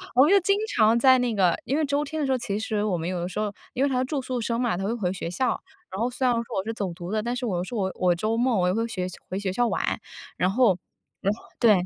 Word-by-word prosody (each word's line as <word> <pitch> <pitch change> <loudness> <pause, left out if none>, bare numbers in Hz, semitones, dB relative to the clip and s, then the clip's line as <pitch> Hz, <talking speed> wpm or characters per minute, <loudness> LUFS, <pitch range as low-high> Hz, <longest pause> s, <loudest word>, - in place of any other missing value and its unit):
我 260 - +8
们 315 - +4
就 400 - +7
经 395 +2 +2 0.2
常 225 +1 +5
在 260 +1 +6
那 240 -3 0
个 180 -3 +3
因 275 - 0
为 315 - +2
周 285 +1 0
天 310 +2 -4
的 290 - +1
时 265 - 0
候， 260 - +3
其 205 -3 -2
实 215 -1 -1
我 195 -5 0
们 165 +1 -3
有 180 -1 -2
的 175 - -3
时 210 - -4
候 210 -1 -1 0.2
因 265 - 0
为 280 - +3
她 255 -1 +1
是 255 - +1
住 285 +1 -2
宿 250 -2 -3
生 230 +1 -1
嘛， 240 -7 +1
她 190 - -3
会 215 +4 0
回 185 -5 -1
学 170 -3 -4
校， 220 +9 0 0.4
然 190 - -5
后 245 - +1
虽 255 +1 -2
然 245 - +4
说 230 - 0
我 190 - 0
是 225 - -2
走 200 -5 -3
读 175 +2 -7
的， 215 0 +1
但 240 +2 -2
是 250 - -3
我 180 -5 -1
是 240 - -6
我 190 -3 0
我 180 -1 +2
周 215 +5 -1
末 240 -2 +2
我 180 - +2
又 180 - +2
会 230 +2 0
学 185 -5 -3 0.2
回 185 - -3
学 195 -2 -2
校 240 +2 +2
玩。 - - -1 0.5
然 180 - +2
后 215 -4 +4 0.6
然 - - -17
后 - - -22
对， 230 -3 +6
225 Hz, 340 characters per minute, -25 LUFS, 190-255 Hz, 0.6 s, 我